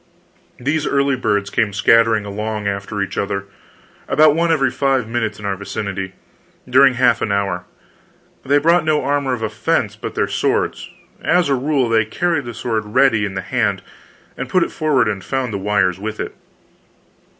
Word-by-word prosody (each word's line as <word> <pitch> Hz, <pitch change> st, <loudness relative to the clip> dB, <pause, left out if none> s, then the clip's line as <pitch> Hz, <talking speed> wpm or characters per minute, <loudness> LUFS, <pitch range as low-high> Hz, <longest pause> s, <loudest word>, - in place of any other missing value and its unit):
These 145 Hz, +4 st, -1 dB
early 140 Hz, -1 st, +2 dB
birds 105 Hz, -5 st, -1 dB
came 105 Hz, -3 st, 0 dB
scattering 115 Hz, 0 st, +3 dB
along 105 Hz, +1 st, -4 dB
after 100 Hz, +1 st, -2 dB
each 100 Hz, -, -4 dB
other, 100 Hz, 0 st, -2 dB, 0.6 s
about 150 Hz, +1 st, +5 dB
one 165 Hz, +1 st, +1 dB
every 135 Hz, -5 st, +2 dB
five 135 Hz, -4 st, 0 dB
minutes 115 Hz, -3 st, -2 dB
in 105 Hz, -, -9 dB
our 100 Hz, -1 st, -1 dB
vicinity, 95 Hz, -1 st, -5 dB, 0.5 s
during 130 Hz, +1 st, +5 dB
half 125 Hz, -2 st, +3 dB
an -, -, -1 dB
hour. 100 Hz, -3 st, -1 dB, 0.8 s
They 140 Hz, +2 st, +3 dB
brought 165 Hz, +3 st, +3 dB
no 155 Hz, -2 st, +1 dB
armor 140 Hz, -1 st, 0 dB
of 115 Hz, -3 st, -4 dB
offense 110 Hz, -, -1 dB
but -, -, -7 dB
their -, -, +1 dB
swords; -, -, -1 dB, 0.3 s
as 175 Hz, -3 st, +2 dB
a -, -, +3 dB
rule, 135 Hz, -1 st, +1 dB
they 115 Hz, -1 st, +3 dB
carried 155 Hz, +6 st, -1 dB
the 120 Hz, -1 st, -7 dB
sword 110 Hz, -3 st, -2 dB
ready 115 Hz, -1 st, +2 dB
in 95 Hz, -1 st, -5 dB
the 95 Hz, -, -2 dB
hand, -, -, -1 dB, 0.5 s
and 135 Hz, -1 st, -5 dB
put 185 Hz, +5 st, +3 dB
it -, -, -4 dB
forward 145 Hz, -7 st, +1 dB
and 100 Hz, -2 st, -3 dB
found 130 Hz, -4 st, -2 dB
the 100 Hz, -, -2 dB
wires 95 Hz, -2 st, +1 dB
with 110 Hz, +1 st, -5 dB
it. -, -, -4 dB
115 Hz, 175 wpm, -19 LUFS, 105-140 Hz, 0.8 s, about